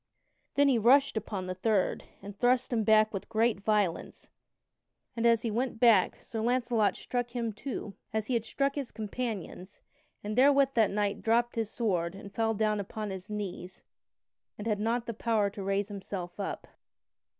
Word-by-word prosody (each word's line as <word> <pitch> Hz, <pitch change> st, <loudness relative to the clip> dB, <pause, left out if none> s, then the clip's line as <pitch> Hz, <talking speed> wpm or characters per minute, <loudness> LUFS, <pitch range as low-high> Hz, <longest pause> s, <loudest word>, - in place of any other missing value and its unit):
Then 285 Hz, 0 st, +5 dB
he 255 Hz, -4 st, +3 dB
rushed 270 Hz, +5 st, +5 dB
upon 200 Hz, -3 st, -3 dB
the 185 Hz, -, -3 dB
third 195 Hz, +1 st, 0 dB, 0.2 s
and 200 Hz, 0 st, -8 dB
thrust 245 Hz, +4 st, +2 dB
him 225 Hz, -2 st, +1 dB
back 215 Hz, 0 st, +4 dB
with 195 Hz, -, -5 dB
great 225 Hz, -1 st, +2 dB
violence, 205 Hz, -4 st, -1 dB, 0.9 s
and 235 Hz, 0 st, +2 dB
as 230 Hz, -1 st, +3 dB
he 230 Hz, -, -1 dB
went 235 Hz, +1 st, -2 dB
back 225 Hz, -6 st, +4 dB
Sir 225 Hz, -, -5 dB
Launcelot 235 Hz, -3 st, +1 dB
struck 245 Hz, -1 st, -3 dB
him, 230 Hz, -2 st, -2 dB
too, 220 Hz, -3 st, -6 dB, 0.2 s
as 220 Hz, -1 st, -1 dB
he 255 Hz, -, -2 dB
had 230 Hz, -2 st, +1 dB
struck 275 Hz, +4 st, -1 dB
his 280 Hz, -4 st, -5 dB
companions 215 Hz, -4 st, -5 dB, 0.4 s
and 210 Hz, +1 st, -3 dB
therewith 275 Hz, +1 st, +5 dB
that 220 Hz, -4 st, +4 dB
knight 205 Hz, 0 st, -1 dB
dropped 235 Hz, +1 st, +2 dB
his 225 Hz, -2 st, -1 dB
sword 185 Hz, -7 st, -1 dB
and 200 Hz, 0 st, -10 dB
fell 225 Hz, 0 st, 0 dB
down 215 Hz, 0 st, +1 dB
upon 210 Hz, +1 st, -5 dB
his 190 Hz, +2 st, -7 dB
knees 190 Hz, -3 st, -6 dB, 0.7 s
and 210 Hz, -, -7 dB
had 210 Hz, -2 st, 0 dB
not 230 Hz, +2 st, 0 dB
power 215 Hz, -4 st, +1 dB
to 205 Hz, 0 st, -7 dB
raise 195 Hz, +1 st, -1 dB
himself 190 Hz, -2 st, -6 dB
up. 200 Hz, -, -4 dB
220 Hz, 175 wpm, -30 LUFS, 200-235 Hz, 0.9 s, Then